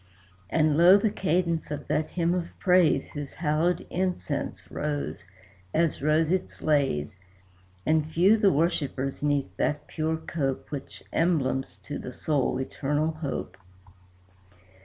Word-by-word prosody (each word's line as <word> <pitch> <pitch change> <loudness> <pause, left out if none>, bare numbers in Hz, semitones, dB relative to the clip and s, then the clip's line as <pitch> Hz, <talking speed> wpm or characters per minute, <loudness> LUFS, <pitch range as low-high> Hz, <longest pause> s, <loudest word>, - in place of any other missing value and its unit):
And 155 -2 +2
low 175 +4 +8
the 205 +1 +1
cadence 170 -3 0
of 150 -1 -5
that 155 - 0
hymn 170 -1 0
of 175 -2 -4
praise 180 -3 +3
Whose 145 -2 -6
hallowed 160 +2 0
incense 180 -5 -3
rose, 145 -9 -3 0.5
as 165 -4 +1
rose 155 +2 +2
its 185 0 -2
lays; 135 - +1 0.7
And 155 -1 +2
few 185 +7 +5
the 210 -3 +4
worshippers 140 -4 -1
'neath 145 -10 0
that 150 0 0
pure 160 0 -2
cope 140 -4 -3
Which 140 -2 -7
emblems 145 -6 +1
to 145 - -5
the 125 - -7
soul 140 -3 0
eternal 145 +4 -1
hope. 155 -3 -5
155 Hz, 130 wpm, -27 LUFS, 145-170 Hz, 0.7 s, low